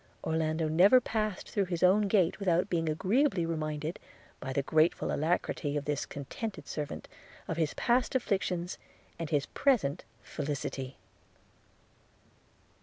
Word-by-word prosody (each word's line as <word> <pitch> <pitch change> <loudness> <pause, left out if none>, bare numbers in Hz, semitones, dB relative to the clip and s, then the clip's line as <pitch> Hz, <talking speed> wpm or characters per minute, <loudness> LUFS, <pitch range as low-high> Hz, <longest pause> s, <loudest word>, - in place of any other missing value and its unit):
– - - -34
Orlando 160 0 0
never 185 +11 +6
passed 215 -4 -2
through 200 -2 0
his 175 -2 -2
own 200 +3 +5
gate 190 -3 +2
without 185 0 +1
being 165 -2 +1
agreeably 190 - +2
reminded, 155 0 -3 0.4
by 135 - -5
the 135 +1 0
grateful 155 +4 +2
alacrity 150 -1 0
of 145 - -3
this 145 -1 -1
contented 155 - -6
servant, 150 -2 -5 0.4
of 165 - -3
his 160 -3 0
past 245 +2 +1
afflictions, 185 -7 -1 0.4
and 165 -3 -3
his 145 -3 +1
present 235 - +1 0.2
felicity. 140 -2 -4
165 Hz, 130 wpm, -31 LUFS, 150-195 Hz, 0.4 s, never